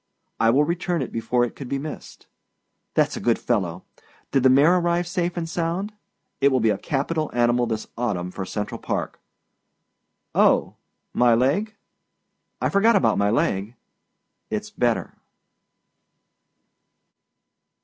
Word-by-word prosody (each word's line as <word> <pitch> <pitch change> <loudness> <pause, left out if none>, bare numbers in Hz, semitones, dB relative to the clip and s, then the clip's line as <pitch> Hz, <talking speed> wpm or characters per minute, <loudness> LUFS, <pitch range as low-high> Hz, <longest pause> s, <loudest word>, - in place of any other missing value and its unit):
I 115 - +4
will 135 +6 +4
return 170 0 -1
it - - -7
before 120 +2 +1
it 120 - -8
could 135 -3 -8
be 140 - -1
missed. 150 +2 -8 0.7
Thatâs - - +2
a - - -4
good 120 -1 +2
fellow! 95 -7 -1 0.5
Did 135 - +3
the 130 - +5
mare 145 +7 +5
arrive 175 0 +1
safe 175 0 -2
and 165 -1 -2
sound? 170 +5 -2 0.5
It 140 +1 +4
will 130 - +2
be 110 -2 +3
a 100 - -1
capital 155 +1 -1
animal 120 0 +2
this 110 -1 -3
autumn 95 -7 -2
for 95 - -5
Central 105 +2 -4
Park. - - -3 1.1
Oh - - +3 0.4
my 120 -1 +4
leg? 155 - +1 0.8
I - - +1
forgot 220 +4 +4
about 115 -3 +3
my 100 0 +2
leg. 105 0 0 0.8
Itâs - - -3
better. - - -1
130 Hz, 140 wpm, -23 LUFS, 115-170 Hz, 1.1 s, the